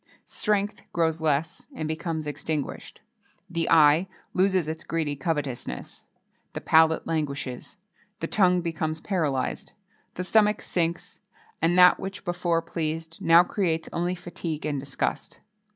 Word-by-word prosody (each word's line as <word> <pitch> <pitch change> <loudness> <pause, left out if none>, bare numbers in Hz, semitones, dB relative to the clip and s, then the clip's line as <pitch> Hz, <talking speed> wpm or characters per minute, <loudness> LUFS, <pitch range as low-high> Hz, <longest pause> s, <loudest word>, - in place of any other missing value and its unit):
Strength 210 -1 -1
grows 160 -1 +1
less, 160 +3 -1
and 155 - -3
becomes 160 0 -3
extinguished; 150 0 -4 0.5
the 170 -2 -2
eye 160 +2 +6 0.3
loses 185 -3 +2
its 160 0 -5
greedy 155 -3 -2
covetousness;[XXII 145 -3 -4
19] - - -45
the - - -5
palate 160 0 +4
languishes; 145 -5 -3 0.4
the - - -2
tongue 180 -3 +3
becomes 160 -2 -2
paralysed; 155 -9 -2 0.4
the 180 - -3
stomach 210 +2 +3
sinks, 175 +1 -2 0.4
and 170 +2 +3
that 180 0 +7
which 195 +1 -7
before 175 -2 0
pleased, 165 0 -4
now 165 +1 +7
creates 170 -4 -1
only 175 +2 -1
fatigue 170 -3 -5
and 145 -2 -1
disgust. 135 0 -3
165 Hz, 130 wpm, -26 LUFS, 155-180 Hz, 0.5 s, that